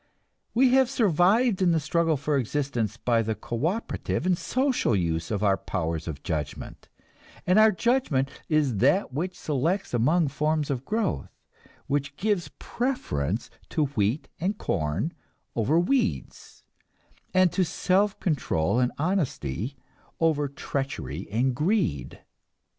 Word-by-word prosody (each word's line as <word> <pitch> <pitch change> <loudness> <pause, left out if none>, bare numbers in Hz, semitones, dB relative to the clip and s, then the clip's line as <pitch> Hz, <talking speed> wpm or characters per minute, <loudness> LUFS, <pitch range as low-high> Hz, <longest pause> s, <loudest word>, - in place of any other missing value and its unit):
We 255 +2 +5
have 260 0 +4
survived 210 - +3
in 175 -2 +4
the 165 - +3
struggle 160 +1 +1
for 145 +2 -1
existence 125 -4 -1
by 115 -1 +2
the 110 0 -2
cooperative 165 - -2
and 185 -1 +3
social 255 - +1
use 85 -3 -1
of 105 -1 -1
our 100 -2 +3
powers 80 -5 -3
of 75 -4 -6
judgment; 75 -6 -5 0.6
and 180 +4 +4
our 220 0 +7
judgment 185 - +1 0.2
is 150 -8 +2
that 140 - +2
which 180 +6 -3
selects 160 +6 -1
among 150 +7 +3
forms 150 +1 0
of 130 -1 -3
growth, 215 -6 -1 0.6
which 140 0 -2
gives 195 -6 0
preference 110 - -2 0.2
to 155 - +1
wheat 105 +7 0
and 195 +5 -1
corn 80 - -1 0.4
over 130 +9 +2
weeds, 250 +8 -1 0.7
and 185 -2 +4
to 190 - +2
self 195 +4 +1
control 120 - 0
and 125 -1 +2
honesty 140 - -2 0.4
over 155 -3 +2
treachery 135 - -4
and 120 +4 +1
greed. 150 - -1
145 Hz, 130 wpm, -26 LUFS, 115-185 Hz, 0.7 s, our